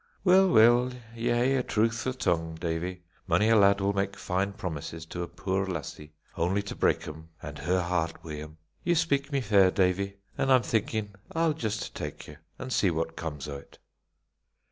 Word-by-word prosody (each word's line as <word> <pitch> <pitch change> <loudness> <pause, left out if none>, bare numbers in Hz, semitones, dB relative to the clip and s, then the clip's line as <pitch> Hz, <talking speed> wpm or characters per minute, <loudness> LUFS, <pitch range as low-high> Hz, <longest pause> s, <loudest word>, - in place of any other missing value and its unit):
"Weel, 190 0 +6
weel, 120 0 +5 0.2
ye 115 +1 -3
hae 125 +3 +2
a - - +2
truthfu' 115 +3 0
tongue, 80 -6 0
Davie. 85 +2 -3 0.2
Mony 90 +6 +3
a 115 - +6
lad 100 -1 +5
will 100 +1 +1
mak 100 0 -1
fine 95 +1 -1
promises 80 -3 -6
to 90 +2 -6
a 85 - -3
puir 95 +3 -2
lassie, 75 -3 -6 0.2
only 95 +4 0
to 100 - -6
break - - +1
'em 80 +1 -9
an' - - -7
her 90 +2 0
heart 85 -2 -2
wi' 75 -2 -6
'em. 75 +1 -10 0.3
Ye 175 0 +2
speak 145 -4 +1
me 140 -1 +1
fair, 100 -5 +5
Davie, 95 +1 +1 0.2
and 135 -1 +2
I'm 130 -2 +6
thinkin' 110 -2 -1 0.2
I'll 165 -1 +2
just 110 -9 -3
tak - - -6
ye, 75 - -11 0.2
an' 130 -1 -6
see 100 - +3
what 80 0 -2
comes 75 -3 -5
o't." 70 -1 -9
100 Hz, 185 wpm, -28 LUFS, 85-115 Hz, 0.3 s, Weel